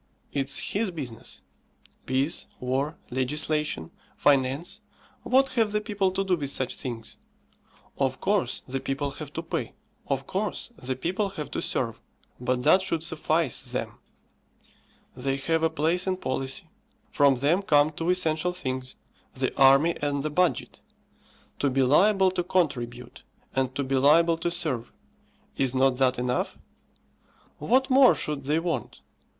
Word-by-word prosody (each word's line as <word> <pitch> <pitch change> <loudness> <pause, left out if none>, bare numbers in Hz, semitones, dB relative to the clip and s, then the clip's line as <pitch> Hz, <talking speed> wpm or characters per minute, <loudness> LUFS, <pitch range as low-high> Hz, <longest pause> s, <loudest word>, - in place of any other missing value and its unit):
It's 135 -1 0 0.2
his 210 +1 +1
business. 135 -10 -8 0.6
Peace, 135 +5 0
War, 135 +5 -1
Legislation, 150 - -1 0.3
Finance 145 +8 +2 0.4
what 270 +1 +3
have 225 -5 +1
the 210 - +2
people 205 -3 0
to 195 +1 0
do 190 -2 +2
with 145 -5 -3
such 130 -2 -1
things? 115 -3 -6 0.8
Of 130 -2 0
course 200 -1 0
the 135 +1 -2
people 140 +1 -2
have - - -8
to - - -4
pay; - - -4 0.3
of - - -1
course - - -2
the 130 +1 -3
people 185 +9 -1
have 150 -6 -7
to - - -2
serve; - - -2 0.4
but 125 0 -1
that 170 +6 +6
should 165 -4 -2
suffice 160 -3 0
them. - - -5 1.2
They 135 +2 -1
have 160 +4 0
a 160 - +3
place 165 +4 0
in 185 -1 0
policy; 135 +2 -4 0.4
from 140 -2 +4
them 145 +9 +2
come 150 -5 +4
two 165 +3 -3
essential 180 -1 +1
things, 130 -6 -4 0.4
the 130 0 -2
army 135 +5 +5
and 145 -1 -1
the 155 - -2
budget. 180 +3 0 0.8
To 140 - +2
be 135 0 +2
liable 190 +8 +4
to 180 -1 -1
contribute, 125 -9 -2 0.3
and 130 -1 0
to 140 - -1
be 135 0 0
liable 165 +5 +5
to 175 - 0
serve; 150 -9 -2 0.7
is 130 -1 0
not 130 -1 +3
that 130 -1 +2
enough? 125 0 -1 1.0
What 260 - +2
more 260 -1 +7
should 145 -3 -4
they 150 +3 +2
want? 165 -8 -3
150 Hz, 145 wpm, -26 LUFS, 130-175 Hz, 1.2 s, more